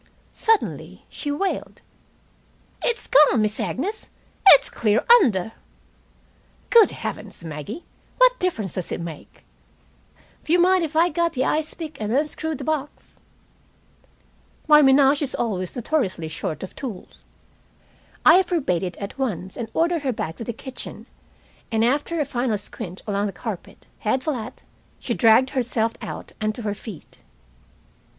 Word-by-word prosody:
Suddenly 450 -2 -1
she 295 - -5
wailed: 380 +7 -3 1.0
"It's 475 - 0
gone, 285 -4 +5
Miss 215 0 -1
Agnes. 405 - -3 0.4
It's 290 - +9
clear 215 0 +1 0.2
under!" 220 - +1 1.2
"Good 460 -3 +7
heavens, - - -7
Maggie! 155 - -7 0.3
What - - +5
difference 225 - -2
does 185 - -5
it - - -3
make?" 170 -3 -9 1.0
"W'you 345 +3 +2
mind 365 0 +4
if 315 -1 -4
I 335 +2 +4
got 340 +1 0
the 260 0 0
ice 310 0 -1
pick 315 -7 -8
and 210 0 -2
unscrewed 305 +3 -1
the - - -7
box?" 300 -2 -4 1.5
My 300 -1 +8
menage 275 +1 +5
is 275 -3 -1
always 185 -6 -2
notoriously 215 - -1
short 155 +1 -4
of 190 - -8
tools. 230 -10 -8 1.0
I 340 +5 +8
forbade 320 - 0
it 180 -2 -4
at 200 +6 -7
once, 190 -8 -3
and 230 -2 -5
ordered 335 +2 +1
her 270 -2 0
back 160 -8 -4
to - - -6
the 235 - -3
kitchen, 260 +3 -9 0.7
and 225 0 +2
after 290 +6 0
a 300 - +1
final 240 -4 -1
squint 190 -2 -8
along 205 0 -1
the - - -4
carpet, 200 0 -7
head 255 +5 0
flat, 255 -5 -4 0.3
she - - -3
dragged 245 +2 +4
herself 235 -4 0
out - - -7
and 215 0 -1
to 240 - -7
her 205 -1 -1
feet. 205 -4 -11
255 Hz, 145 wpm, -23 LUFS, 210-310 Hz, 1.5 s, It's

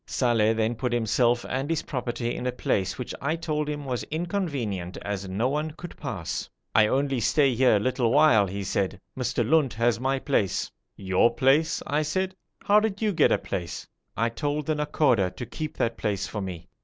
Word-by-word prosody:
Saleh 115 -3 +2
then 110 +1 +1
put 125 +2 -2
himself 120 +1 +2
and 135 +3 -2
his 165 -2 0
property 120 -3 -3
in 125 - -3
a - - +1
place 100 -5 -1
which 125 - -5
I 155 +4 0
told 150 -2 -2
him 145 -1 -4
was 125 -3 -2
inconvenient 145 - -3
as 100 -2 -4
no 105 +6 0
one 150 +3 -1
could 175 - -8
pass. 95 - -4 0.2
'I 110 - +5
only 135 +1 +1
stay 135 +4 +3
here 125 -1 +4
a - - +3
little 125 +1 +1
while,' 120 -8 +5
he 100 +2 -4
said. 95 0 -1 0.2
'Mr. 125 -2 -1
Lunt 150 -3 +3
has 115 0 +2
my 135 +2 0
place.' 130 -8 0 0.2
'Your 95 +4 +2
place!' 140 +5 +3
I 150 +1 +1
said. 185 +5 -1 0.3
'How 205 +1 +5
did 210 -2 -2
you 210 -2 +2
get - - +4
a - - +4
place?' 90 -5 -5 0.3
'I 115 +1 +2
told 145 +5 -2
the 155 - +1
Nakhoda 145 -9 +2
to 125 - -5
keep 155 +3 -6
that 115 0 0
place 100 -2 -1
for 105 +1 -5
me.' 90 -3 -6
125 Hz, 195 wpm, -26 LUFS, 105-150 Hz, 0.3 s, I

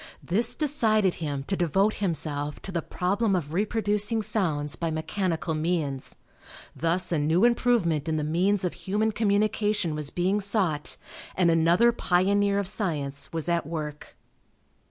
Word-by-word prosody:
This 220 +6 +1
decided 220 - +2
him 145 -3 -3
to 195 - -2
devote 190 +5 +1
himself 150 -6 -1
to 195 - -7
the 170 -2 -1
problem 195 +5 0
of 155 -4 -3
reproducing 210 +2 +1
sounds 165 -9 0
by 170 - -2
mechanical 160 +1 -2
means. 155 -4 -2 0.6
Thus 170 +3 +1
a 165 - +1
new 160 +8 +2
improvement 230 - +1
in 155 - 0
the 150 - -1
means 180 +5 +1
of 180 - -2
human 205 +5 -1
communication 210 -3 +1
was 150 -2 -1
being 190 +6 0
sought 190 -7 -1 0.4
and 175 -2 +3
another 170 +8 +4
pioneer 200 0 +1
of 200 -2 -1
science 145 -9 -2
was 165 -1 -3
at 170 -3 0
work. 150 -2 -6
180 Hz, 145 wpm, -26 LUFS, 160-205 Hz, 0.6 s, another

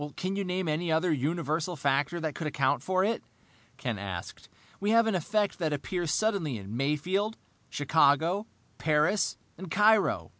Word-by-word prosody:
"Can 185 +1 -2
you 200 - -1
name 185 -1 -2
any 160 +2 -1
other 160 +2 +2
universal 160 +3 -1
factor 140 +3 0
that 155 -2 -2
could 155 - -4
account 145 -2 +1
for 185 +5 +1
it?" 225 +3 0 0.5
Ken 120 -5 -3
asked. 95 -4 -7 0.3
"We 205 - -1
have 230 +1 +5
an 220 - +1
effect 205 +4 0
that 160 -3 0
appears 175 +3 -3
suddenly 175 - 0
in 100 +2 -7
Mayfield, 175 - 0 0.3
Chicago, 160 +7 +2 0.3
Paris, 155 +6 +2 0.2
and 190 -2 -7
Cairo. 210 +4 +3
165 Hz, 155 wpm, -29 LUFS, 145-195 Hz, 0.5 s, have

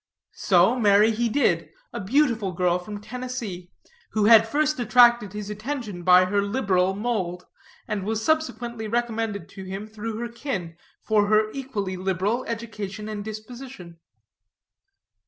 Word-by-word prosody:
So, 190 +7 +4
marry 210 0 +5
he 230 +2 0
did, 280 +5 +1 0.2
a - - -4
beautiful 225 -3 +1
girl 180 0 +1
from 205 +3 -7
Tennessee, 225 -6 -6 0.4
who 215 -1 +2
had 225 0 +7
first 305 +3 0
attracted 240 -3 +4
his 210 0 -5
attention 215 -3 -5
by 180 +1 +6
her 200 +2 +1
liberal 195 -4 +1
mould, 195 -5 -2 0.4
and 205 -2 -2
was 220 +2 -2
subsequently 240 -8 -1
recommended 225 -2 -2
to 195 - -10
him 195 +2 -6
through 215 0 -6
her 240 +1 -3
kin, 230 - -5 0.3
for 210 -2 +2
her 215 0 +3
equally 215 -9 -4
liberal 190 +6 -1
education 215 -3 -5
and 210 -1 -5
disposition. 215 -4 -9
215 Hz, 140 wpm, -24 LUFS, 195-235 Hz, 0.4 s, had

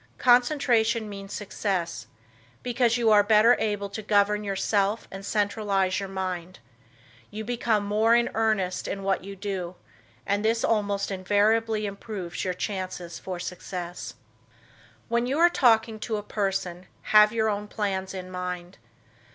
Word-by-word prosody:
Concentration 245 -3 +3
means 195 -1 -8
success, 190 -4 -3 0.6
because 240 -1 +1
you 230 -2 +3
are 210 -1 +7
better 215 +3 +5
able 205 -2 -1
to 205 +2 -6
govern 210 0 +2
yourself 200 +1 0
and 195 0 -8
centralize 200 -2 0
your 195 -1 -5
mind; 185 -2 -4 0.7
you 215 +1 -6
become 230 -3 0
more 215 +3 +3
in 235 0 +3
earnest 215 -5 0
in 195 0 -4
what 195 -1 0
you 200 +1 -8
do 185 -3 -4 0.5
and 205 +1 0
this 225 +1 +1
almost 205 -3 0
invariably 210 +3 +1
improves 200 -3 -5
your 185 -1 -2
chances 185 -3 -5
for 185 -2 -6
success. 180 0 -6 0.9
When 235 +1 0
you 270 +3 -1
are 345 +1 +5
talking 225 -6 +3
to 220 0 -2
a 210 - -5
person 190 -4 -3 0.3
have 210 0 +8
your 220 -1 +1
own 210 -1 -2
plans 195 -3 -3
in 185 -1 -7
mind. 180 -3 -5
205 Hz, 145 wpm, -26 LUFS, 190-220 Hz, 0.9 s, have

